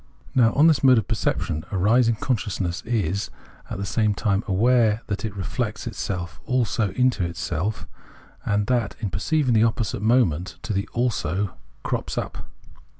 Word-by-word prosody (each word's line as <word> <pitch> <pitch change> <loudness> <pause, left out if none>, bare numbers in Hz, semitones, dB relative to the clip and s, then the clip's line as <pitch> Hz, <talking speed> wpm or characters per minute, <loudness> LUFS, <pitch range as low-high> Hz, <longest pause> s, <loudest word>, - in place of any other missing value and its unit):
Now, 115 -3 +5
on 145 - +5
this 160 -4 +4
mode 130 -2 +7
of 110 - 0
perception 80 -8 -1
arising, 115 +5 +3
con 125 +4 0
sciousness 95 -4 -3
is 100 -3 -1 0.4
at - - -4
the 100 - -3
same 105 +1 +1
time 100 +3 0
aware 115 +2 +3
that 100 -2 -3
it 110 -3 -4
reflects 95 -3 -3
itself 85 -4 -4
also 120 -4 0
into 125 -3 +2
itself, 85 +3 -3 0.6
and 105 0 +1
that, 115 -4 0
in 105 -5 -3
perceiving, 135 - +1
the 110 - +4
opposite 115 -2 0
moment 105 -7 +2
to 110 - -2
the 100 0 -2
" - - -31
also 105 -5 0 0.2
" - - -33
crops - - -3
up. - - -4
105 Hz, 165 wpm, -24 LUFS, 95-120 Hz, 0.6 s, mode